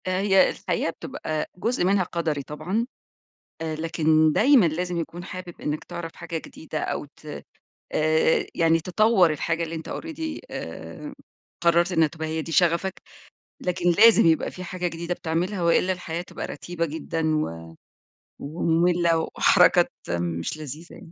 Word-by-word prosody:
آآ، 185 +1 0
هي 195 -2 +5
الحقيقة 175 -2 -2
بتبقى 155 -1 -4
جُزء 230 +2 0
منها 195 0 +3
قدري 165 -5 -2
طبعًا، 175 - -2 0.8
آآ 160 -1 -2
لكن 160 -1 +3
دايمًا 245 - +5
لازم 175 +2 -1
يكون 170 +2 -5
حابب 185 -2 -8
إنَّك 150 +1 -2
تعرف 165 -1 -7
حاجة 165 0 -5
جديدة 155 -1 -7
أو - - -3
ت 145 - -22 0.7
آآ، 155 +1 +2
يعني 165 0 +3
تطوَّر 185 +1 +3
الحاجة 165 +2 -1
اللي 165 0 -4
أنتَ 160 -1 -6
already 320 -1 -5
آآ، - - -7 0.5
قررت 170 +2 +4
إنها 165 -2 +4
تبقى 160 +1 -6
هي 160 0 -2
دي 165 - -7
شغفك. 175 +3 +2 0.6
لكن 180 -5 +1
لازم 225 +3 +7
يبقى 160 -1 +3
في 185 - -8
حاجة 180 0 -3
جديدة 170 +1 -4
بتعملها 175 +4 -2
وإلا 170 +2 +3
الحياة 175 -2 -4
تبقى - - -7
رتيبة 175 -1 -4
جًدا 160 0 -1
و 85 - -3 0.7
ومملة، 170 +2 +2 0.2
وحركات - - +5 0.3
مش 85 - -3
لذيذة 155 +3 -8
يعني. 165 - -13
170 Hz, 150 wpm, -25 LUFS, 160-180 Hz, 0.8 s, لازم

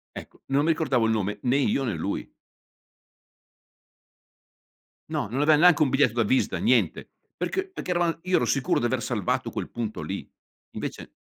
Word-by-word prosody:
Ecco, - - -10
non 140 +2 +2
mi 165 - +4
ricordavo 135 -7 +1
il 110 - +2
nome 105 -1 -1
né 130 +2 +2
io 140 0 +1
né 115 -5 -1
lui. - - -3 2.8
No, - - -1
non 130 +7 -2
aveva 150 +1 +5
neanche 175 -1 +5
un 140 - +4
biglietto 135 -4 +3
da 120 -1 +2
visita, 130 +5 +1
niente. - - +1 0.3
Perché 385 0 -2
perché 350 - -5
eravam 175 -2 0
io 185 0 +1
ero - - +3
sicuro 135 -3 +1
di 120 - -1
aver 120 0 0
salvato 110 -7 -1
quel - - -5
punto 115 -2 -4
lì. - - -5 0.4
Invece - - -6
135 Hz, 170 wpm, -26 LUFS, 115-160 Hz, 2.8 s, aveva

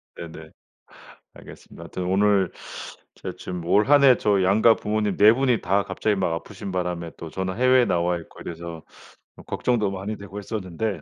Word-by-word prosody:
네네. 80 -2 -9 0.8
알겠습니다. - - -13
하여튼 90 - -5
오늘 95 0 +2 0.6
제가 - - -7
지금 90 -2 -6
올 105 +4 +3
한 145 -1 +6
해 130 -2 +7
저 100 -3 +2
양가 110 +4 +5
부모님 105 -1 -1
4 105 +2 +7
분이 125 -3 +1
다 100 +2 +1
갑자기 105 -1 -1
막 90 -3 0
아프신 95 +3 -6
바람에 90 -2 -3
또 80 - -8
저는 95 +3 -4
해외에 130 0 +5
나와 85 0 +1
있고 85 - -13
이래서 85 -1 -7 0.5
또 - - -14
걱정도 110 -6 0
많이 100 +3 -5
되고 100 0 -10
했었는데. 105 0 -4
95 Hz, 345 characters per minute, -24 LUFS, 90-110 Hz, 0.8 s, 해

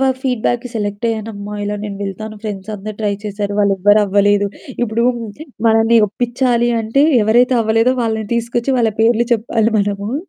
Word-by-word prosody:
వ - - 0 0.2
ఫీడ్‌బ్యాక్‌కి 245 -1 -1
సెలెక్ట్ 205 +1 -3
అయ్యానమ్మా 210 -2 -5
ఇలా 205 0 -2
నేను 200 -1 -6
వెళ్తాను 215 +3 -6
ఫ్రెండ్స్ 205 0 -5
అందరూ 210 +1 -7
ట్రై 205 -2 0
చేశారు 205 0 -3
వాళ్ళు 200 -1 +3
ఎవ్వరు 205 +2 +4
అవ్వలేదు. 205 0 +2 0.3
ఇప్పుడు 230 +1 0 0.6
మనల్ని 225 +1 +4
ఒప్పిచాలి 240 +1 0
అంటే 225 +6 +1 0.2
ఎవరైతే 245 +4 +3
అవ్వలేదో 225 +4 +2
వాళ్ళని 220 -2 -2
తీసుకొచ్చి 235 +2 -1
వాళ్ళ 225 -3 +2
పేర్లు 235 +1 +3
చెప్పాలి 225 0 0
మనము. 205 +3 -2
220 Hz, 150 wpm, -17 LUFS, 205-235 Hz, 0.6 s, ఎవ్వరు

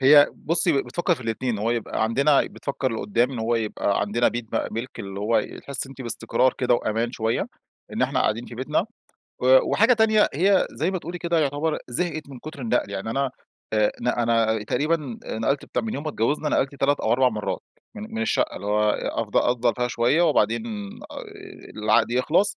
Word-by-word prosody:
هي 145 +2 +8
بٌصّي، 165 -3 +2
بتفكر 175 +1 0
في 145 - -13
الاتنين، 120 +1 -2
إن 105 - -3
هو 110 +3 0
يبقى 115 -2 -1
عندنا 140 +6 +3
بتفكر 135 -3 -3
لقدام 115 +3 0
إن 125 - -5
هو 115 +1 0
يبقى 105 -3 0
عندنا 105 +4 +2
بيت 120 0 -4
بقى - - 0
مِلك، 115 +4 -5
اللي 100 0 -6
هو 110 +3 +2
يحس 140 -1 -5
أنتِ 135 0 -12
باستقرار 120 +2 +1
كده 125 -1 +3
وأمان 115 +1 -1
شويّة، 115 -1 -1 0.5
إن - - -1
إحنا - - +1
قاعدين 115 +3 0
في - - -9
بيتنا. 140 +9 0 0.6
و 130 +1 +6
وحاجة 230 +4 +5
تانية 220 -2 +4
هي 190 +6 +3
زي 165 +5 -1
ما 185 - -2
تقولي 170 +3 -6
كده 170 -1 0
يعتبر 150 +2 0
زهقت 155 +3 -3
من 130 -3 -9
كتر 155 0 -9
النقل، 115 -4 0
يعني 100 +2 -4
أنا 135 +2 0 0.4
آآ، 105 -1 +3
ن 120 - -2
أنا 115 -2 +2
تقريبًا 145 0 -1
نقلت 135 +6 -1
بتاع - - -2
من 220 - -3
يوم 145 - -4
ما 155 - -2
اتجوزنا، 145 +5 0
نقلت 135 +1 0
3 140 +1 +1
أو - - 0
4 130 +1 +4
مرات 105 -3 -3 0.3
من 210 - -6
من 225 - -1
الشقّة 220 - 0
اللي 100 - -7
هو 105 +1 +2
أفض - - -2
أفضل 120 -1 +2
فيها 125 0 0
شويّة 120 +8 +2
وبعدين 115 -7 +2 0.5
آآ، - - -9 0.7
العقد 110 +2 +3
يخلص، 165 +11 +2
125 Hz, 195 wpm, -24 LUFS, 115-150 Hz, 0.7 s, هي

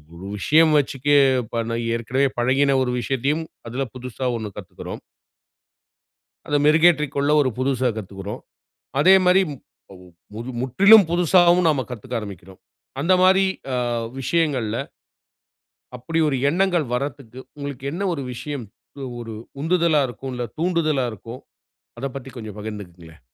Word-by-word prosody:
ஒரு 95 +3 -9
விஷயம் 155 +7 +4
வச்சுக்க 140 -1 -2 0.5
பழ 115 0 -2 0.2
ஏற்கனவே 130 +4 0
பழகின 135 +2 +3
ஒரு 125 -1 -2
விஷயத்தையும் 135 +6 -1 0.3
அதுல 135 +3 -2
புதுசா 125 0 -5
ஒண்ணு 110 -2 -6
கத்துக்குறோம். - - -8 1.5
அத 145 -2 +1
மெருகேற்றிக்கொள்ள 150 -3 +3
ஒரு 135 -3 +2
புதுசா 130 -1 +1
கத்துக்குறோம். 100 0 -7 0.6
அதே 185 +6 +7
மாரி, 180 +2 +5
முப் 140 - -11 0.3
மவ் 90 0 -15 0.3
முறு 120 +3 -6
முற்றிலும் 195 - +6
புதுசாவும் 175 0 +4
நாம 145 -4 +2
கத்துக்க 125 0 -5
ஆரம்பிக்கிறோம். 95 -3 -10 0.4
அந்த 175 +6 +3
மாரி 190 +1 +5 0.3
அ, - - 0 0.4
விஷயங்கள்ல, 130 -7 0 1.2
அப்படி 160 +7 -3
ஒரு 140 - 0
எண்ணங்கள் 175 -1 +1
வர்றதக்கு 130 -2 -5 0.2
உங்களுக்கு 140 -2 -7
என்ன 195 +4 -2
ஒரு 140 - -5
விஷயம் 140 +1 -5 0.4
ஒவ் 125 -2 -6
ஒரு 115 -2 -7 0.3
உந்துதலா 165 -1 +2
இருக்கும், 130 +2 -7
இல்ல 125 0 -3
தூண்டுதலா 160 -5 +1
இருக்கும்? 115 +4 -10 0.6
அத 135 - -3
பத்தி 135 0 -7
கொஞ்சம் 110 -3 -8
பகிர்ந்துக்குங்களேன். 90 -7 -9
135 Hz, 130 wpm, -22 LUFS, 115-160 Hz, 1.5 s, அதே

